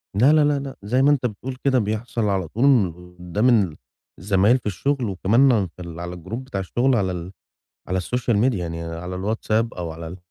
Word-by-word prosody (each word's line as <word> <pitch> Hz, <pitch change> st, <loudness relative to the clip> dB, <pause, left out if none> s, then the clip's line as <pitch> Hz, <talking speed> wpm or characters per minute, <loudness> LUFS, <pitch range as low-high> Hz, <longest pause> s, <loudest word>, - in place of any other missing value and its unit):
لا، 130 Hz, +9 st, +5 dB
لا، 155 Hz, -1 st, +5 dB
لا، 145 Hz, -1 st, +2 dB
لأ 135 Hz, -1 st, -7 dB
زي 125 Hz, +6 st, +1 dB
ما 145 Hz, +2 st, +5 dB
أنت 135 Hz, -3 st, +1 dB
بتقول 125 Hz, +3 st, -4 dB
كده 135 Hz, -2 st, +3 dB
بيحصل 110 Hz, +2 st, -2 dB
على 95 Hz, -3 st, 0 dB
طول 120 Hz, -, +3 dB
وقدّام 90 Hz, +6 st, -2 dB
ال 100 Hz, -10 st, +2 dB, 0.4 s
الزمايل 100 Hz, +6 st, +3 dB
في 125 Hz, -, -15 dB
الشُغل 130 Hz, +6 st, -1 dB
وكمان 115 Hz, +8 st, +3 dB
اغ 105 Hz, -5 st, +2 dB
في 90 Hz, -, -11 dB
ال 85 Hz, -1 st, -8 dB
على 90 Hz, 0 st, -5 dB
الجروب 110 Hz, +9 st, -6 dB
بتاع 130 Hz, -7 st, -5 dB
الشُغل 120 Hz, +7 st, +1 dB
على 95 Hz, -5 st, +1 dB
ال 90 Hz, +1 st, -6 dB, 0.6 s
على 95 Hz, -, -1 dB
السوشيال 115 Hz, +4 st, 0 dB
ميديا 115 Hz, -3 st, +2 dB
يعني 85 Hz, -1 st, -4 dB
على 85 Hz, +2 st, -5 dB
الwhatsapp 110 Hz, +3 st, 0 dB
أو 85 Hz, -2 st, -4 dB
على 80 Hz, +1 st, -8 dB
ال 90 Hz, +3 st, -8 dB
105 Hz, 210 wpm, -22 LUFS, 90-125 Hz, 0.6 s, لا